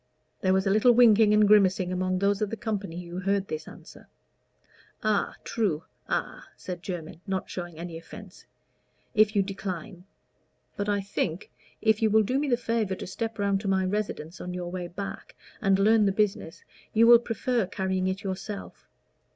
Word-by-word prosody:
There 185 - +2
was 190 +1 +2
a 195 - +2
little 215 +4 +5
winking 225 -3 +6
and 210 0 +5
grimacing 190 -3 +4
among 185 0 0
those 200 +1 +1
of 210 - 0
the 225 - -5
company 195 -5 -4
who 175 +1 -6
heard 195 +1 0
this 155 0 -5
answer. - - -13 1.0
"A 215 -2 +1
true 185 -9 -1 0.2
a," - - -2 0.2
said 180 -2 -6
Jermyn, 170 -3 -6
not 190 -1 -3
showing 175 -3 -6
any 170 -1 -6
offence; 195 +3 -13 0.7
"if 215 0 +4
you 200 - +4
decline. 190 -1 -6 0.7
But 205 0 -2
I 205 -1 +1
think, 190 -2 -3 0.3
if 220 -1 +3
you 220 - +4
will 220 +1 +4
do 255 +6 0
me 290 0 -1
the 240 - +3
favor 230 -5 -1
to - - -7
step 225 +3 -4
round 200 -1 +1
to 205 - -5
my 190 -1 +2
residence 185 -4 -3
on 180 0 -5
your 175 -1 -4
way 180 -1 -4
back, 195 +3 -7 0.3
and 195 -3 +3
learn 210 +1 +4
the - - +3
business, 195 -5 -1 0.3
you 225 +1 +6
will 235 0 +9
prefer 235 -2 -1
carrying 190 -1 -1
it 190 +1 -3
yourself. 195 +1 -6
195 Hz, 180 wpm, -27 LUFS, 185-215 Hz, 1.0 s, will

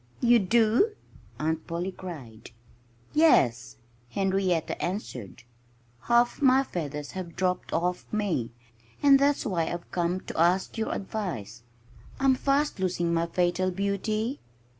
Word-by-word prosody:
"You 240 -1 +5
do?" 230 - +3 0.4
Aunt 160 +1 -2
Polly 175 +3 -3
cried. 135 -13 -9 0.6
"Yes!" 130 - +3 0.3
Henrietta 190 0 0
answered. 130 - -5 0.6
"Half 240 +2 +3
my 265 -1 +5
feathers 150 - -5
have 180 -3 -7
dropped 180 -1 -1
off 180 +2 -2
me. 195 - -1 0.5
And 275 -1 +7
that's 280 +1 +2
why 170 -5 0
I've 175 0 -6
come 175 +1 0
to - - -6
ask 175 +3 +2
your 225 -1 -2
advice. 170 - -4 0.6
I'm 270 -1 +4
fast 275 0 0
losing 175 -2 0
my 165 0 +1
fatal 180 +2 +1
beauty." 205 +6 -2
185 Hz, 120 wpm, -27 LUFS, 170-225 Hz, 0.6 s, And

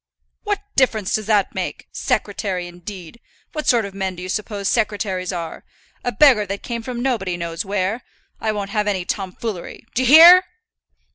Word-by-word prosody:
"What 410 -1 -1
difference 220 -7 +2
does 215 -1 -1
that 210 -3 +2
make? - - -5
Secretary, 195 -3 -2
indeed! 180 +3 -10 0.3
What 305 -1 -4
sort 235 -3 +3
of 200 - -8
men 190 -1 -3
do 180 - -8
you 185 - -6
suppose 205 0 -3
secretaries 200 -5 -1
are? 170 -3 -6 0.4
A 245 - -1
beggar 245 -7 +5
that 200 +1 -5
came 235 -1 -4
from 240 +1 -5
nobody 195 -9 -1
knows 170 -1 -4
where! 200 +3 -2 0.4
I 220 - 0
won't 200 -2 -4
have 210 -1 0
any 190 -4 -1
tomfoolery; 195 0 -5
d'ye 255 +1 +1
hear?" 340 +6 +9
205 Hz, 165 wpm, -21 LUFS, 185-235 Hz, 0.4 s, hear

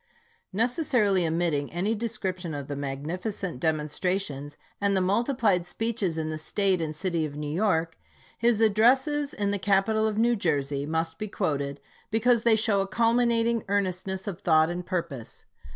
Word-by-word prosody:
Necessarily 220 - +2
omitting 160 -3 0
any 190 +6 0
description 190 -7 -3
of 140 -1 -5
the 145 - -4
magnificent 155 - -4
demonstrations, 150 -1 -2 0.2
and 200 -1 +2
the - - +3
multiplied 200 -2 +1
speeches 215 -5 -2
in 155 -1 -2
the 155 - -4
State 190 +2 0
and 155 -1 -3
city 170 -1 -1
of 145 -2 -4
New 150 0 -4
York, 165 -4 0 0.4
his 235 -1 +2
addresses 260 +7 +3
in 200 -1 -1
the 205 - -1
capital 205 +3 +2
of 215 -1 -2
New 235 +2 +3
Jersey 145 -7 -1
must 160 +1 -2
be 215 - -3
quoted, 145 -8 -2 0.3
because 230 +2 +3
they 230 -1 +4
show 215 -2 +2
a 195 - -2
culminating 230 +1 +2
ear 200 0 +3
nestness 190 0 -4
of 195 -4 -5
thought 160 0 +4
and 175 +1 -4
purpose. 165 -10 -5
190 Hz, 160 wpm, -27 LUFS, 160-220 Hz, 0.4 s, they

